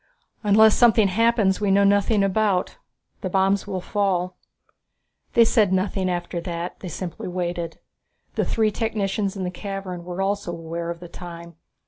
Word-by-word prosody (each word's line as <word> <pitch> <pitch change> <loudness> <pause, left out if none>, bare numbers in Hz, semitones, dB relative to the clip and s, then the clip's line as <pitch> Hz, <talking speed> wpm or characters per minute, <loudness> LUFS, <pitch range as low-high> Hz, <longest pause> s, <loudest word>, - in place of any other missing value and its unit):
"Unless 215 +1 +5
something 225 -4 +5
happens 220 -1 +2
that - - -15
we 205 - +2
know 200 +1 +4
nothing 200 +1 +3
about, 195 - +1 0.4
the 185 - -2
bombs 195 +2 +1
will 190 -2 -3
fall." 185 -2 -1 1.0
They 235 - +6
said 215 -4 +3
nothing 190 0 0
after 175 -1 -3
that 170 0 -5
they 185 - -7
simply 175 +1 -6
waited. 175 -2 -3 0.6
The - - 0
three 220 -1 +1
technicians 205 -2 -1
in 190 - -3
the 180 - -2
cavern 190 -2 -6
were 180 +1 -6
also 195 -2 -1
aware 170 0 -5
of 170 0 -6
the 175 - -8
time. 170 -1 -10
190 Hz, 160 wpm, -23 LUFS, 175-205 Hz, 1.0 s, They